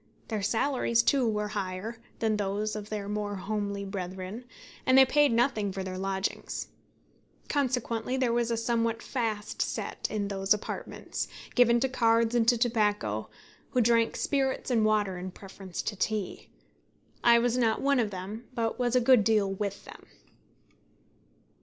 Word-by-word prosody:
Their 215 -3 -2
salaries, 230 +1 +1
too, 260 0 +3
were 210 -1 -1
higher 200 +3 -4 0.2
than 220 -1 +1
those 210 +1 -1
of 210 0 -6
their 210 -2 -4
more 205 0 -2
homely 200 0 -3
brethren; 190 +3 -6 0.4
and 260 0 +4
they 265 - +9
paid 290 +1 +4
nothing 230 -4 +1
for 190 0 -4
their 185 0 -5
lodgings. 195 +1 -3 0.8
Consequently 250 -3 0
there 255 -3 +1
was 240 0 +1
a 230 - 0
somewhat 230 0 0
fast 220 -5 -2
set - - -2
in 205 -2 -2
those 195 +1 +2
apartments, 210 - -5 0.3
given 240 -1 +5
to 265 - +3
cards 230 -2 +2
and 235 -2 +2
to 240 0 +5
tobacco, 210 - 0 0.4
who 250 - +2
drank 230 0 +3
spirits 270 -2 0
and 225 -3 +3
water 205 -4 +1
in 185 +1 -5
preference 190 -1 -8
to 210 - -3
tea. 205 0 -3 0.7
I 235 0 +7
was 240 0 +2
not 235 -3 +2
one 280 -1 +2
of 225 -3 +1
them, 200 +5 -7
but 230 0 -1
was 245 0 +1
a 250 - +5
good 245 -2 +6
deal 205 -3 +2
with 200 0 -4
them. - - -13
220 Hz, 160 wpm, -29 LUFS, 200-240 Hz, 0.8 s, they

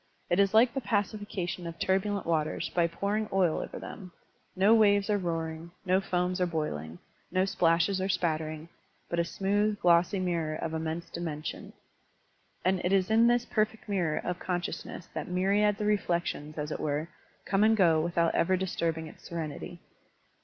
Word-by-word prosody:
It 175 - +3
is 200 -1 +4
like 235 +2 +6
the 270 - -2
pacification 200 -5 -2
of 165 0 -7
turbulent 195 +2 0
waters 160 0 0
by 170 -1 +3
potu* 200 +5 -2
ing 215 - -3
oil 185 -4 +2
over - - -6
them: 185 -4 -9 0.4
no 195 +4 +5
waves 205 -2 +4
are 205 - +3
roaring, 165 -2 -3 0.2
no 185 +1 +3
foams 180 -1 -1
are 180 - +3
boiling, 85 - -3 0.3
no 185 +1 +2
splashes 180 0 +2
are 190 - -1
spattering, 155 -3 -1 0.4
but 170 - -1
a - - +4
smooth, 205 +4 0
glossy 175 +2 +4
mirror 170 -4 -1
of 160 +1 -4
immense 160 +1 -3
dimen 160 -3 -5
sion. - - -6 0.9
And 185 0 +2
it 180 - +1
is 195 +1 +2
in 225 +1 +5
this 240 0 +3
perfect 215 0 -1
nwrror 175 -7 -1
of 180 -1 -2
con 180 -1 -1
sciousness 175 - -6
that - - -4
myriads 200 +3 +2
of 210 - -1
reflections, 175 -7 -1
as 150 0 -3
it - - -3
were, 150 +1 -1 0.4
come 195 +1 +2
and 220 0 +4
go 165 -5 +4
without 170 0 +1
ever 185 +2 +2
disturbing 165 -3 -2
its 155 - -13
serenity. 165 +1 -6
180 Hz, 175 wpm, -29 LUFS, 165-200 Hz, 0.9 s, like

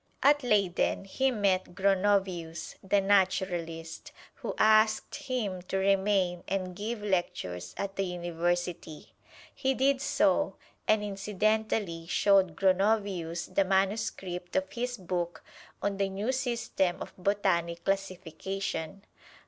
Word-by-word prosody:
At 290 +1 +5
Leyden 200 -5 +1
he 265 +7 +1
met 195 -6 0
Gronovius, 190 -4 +1
the 195 +1 +2
naturalist, 185 -4 0 0.2
who - - -5
asked 215 0 +4
him 215 -8 -3
to 195 - -1
remain 190 -2 +2
and 185 -1 -2
give 210 +2 -4
lectures 90 - -2
at 200 0 -4
the 195 - +1
University. 175 -2 -3 0.4
He 265 -1 0
did 270 +1 +2
so, - - +2 0.3
and 215 -1 +3
incidentally 205 -3 -1
showed 190 -2 +3
Gronovius 190 -3 +1
the 195 - +4
manuscript 190 -2 -1
of 190 0 0
his 245 +3 -3
book 175 -2 -3 0.4
on 200 -1 0
the 195 -1 0
new 200 +6 -1
system 235 -8 -1
of - - -7
botanic 175 -3 0
classification. 195 -1 -3
195 Hz, 115 wpm, -29 LUFS, 175-205 Hz, 0.4 s, At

